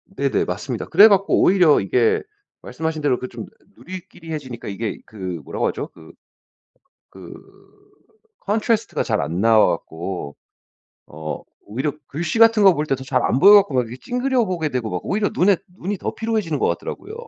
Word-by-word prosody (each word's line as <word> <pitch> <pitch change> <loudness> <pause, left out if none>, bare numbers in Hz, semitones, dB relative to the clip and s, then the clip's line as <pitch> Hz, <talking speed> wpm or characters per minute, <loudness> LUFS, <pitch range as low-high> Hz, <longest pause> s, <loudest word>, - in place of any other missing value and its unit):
네네. 140 -4 0
맞습니다. 110 +6 -4
그래 200 +6 +7
갖고 200 -1 +3
오히려 180 -5 +5
이게 115 +4 +1 0.4
말씀하신 160 -1 -4
대로 135 -4 +1
그 130 - -5
좀 115 -3 -8 0.3
누리끼리해지니까 165 -8 -8
이게 105 +2 -4
그 95 -6 -6
뭐라고 - - -2
하죠? - - -4
그 80 -1 -15 1.0
그 95 -3 -12 1.2
contrast가 220 +2 0
잘 110 -6 -1
안 85 +3 -3
나와 115 -1 +5
갖고 85 -3 -7 0.7
어 75 0 -7 0.2
오히려 130 +8 -3 0.2
글씨 160 +7 -3
같은 225 -2 +6
거 190 -3 +7
볼 150 +1 -2
때 135 - 0
더 130 - -9
잘 130 -1 0
안 125 - +1
보여 195 +7 +8
갖고 190 -9 +5
막 125 - +3
이렇게 120 +2 -8
찡그려 250 -1 0
보게 170 -4 -2
되고 125 -5 -3
막 90 - -3
오히려 205 +1 0
눈에 190 +1 +3 0.2
눈이 195 +2 -3
더 - - -4
피로해지는 215 -10 -2
것 - - +1
같더라고요. 430 - -5
145 Hz, 365 characters per minute, -21 LUFS, -, 1.2 s, 보여